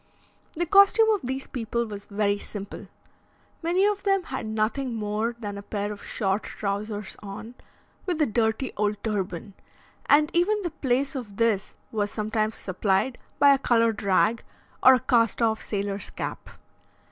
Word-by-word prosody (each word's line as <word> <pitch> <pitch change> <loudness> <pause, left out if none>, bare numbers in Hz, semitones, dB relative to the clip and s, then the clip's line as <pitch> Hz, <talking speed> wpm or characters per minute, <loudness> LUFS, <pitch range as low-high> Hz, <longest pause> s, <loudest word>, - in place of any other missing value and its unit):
The 345 +2 0
costume 400 +5 +6
of 420 - +1
these 265 +2 -3
people 235 -1 -2
was 205 -2 -8
very 205 0 0
simple. 205 -1 -8 0.7
Many 350 +4 +2
of 410 -1 +1
them 390 -2 +2
had 260 -7 -5
nothing 225 +4 -1
more 215 +2 -1
than 205 -3 -5
a - - -7
pair 205 0 -3
of 205 - -8
short 195 +1 -1
trousers 205 0 -4
on, 210 +3 -8 0.5
with 350 -3 -1
a 305 - +4
dirty 220 +2 0
old 210 0 +1
turban, 200 -2 -3 0.5
and 300 +1 +5
even 390 +5 +2
the 345 - -2
place 270 -1 0
of 235 -8 -7
this 225 -4 +1 0.2
was 205 -2 0
sometimes 215 +1 -1
supplied 195 +6 0 0.2
by 285 -1 +7
a 275 - +1
coloured 230 -4 +2
rag, 210 +4 +2 0.4
or 260 0 +8
a - - +1
cast 230 -3 +2
off 225 -2 +1
sailor's 200 -1 -3
cap. - - -6
225 Hz, 160 wpm, -26 LUFS, 205-270 Hz, 0.7 s, or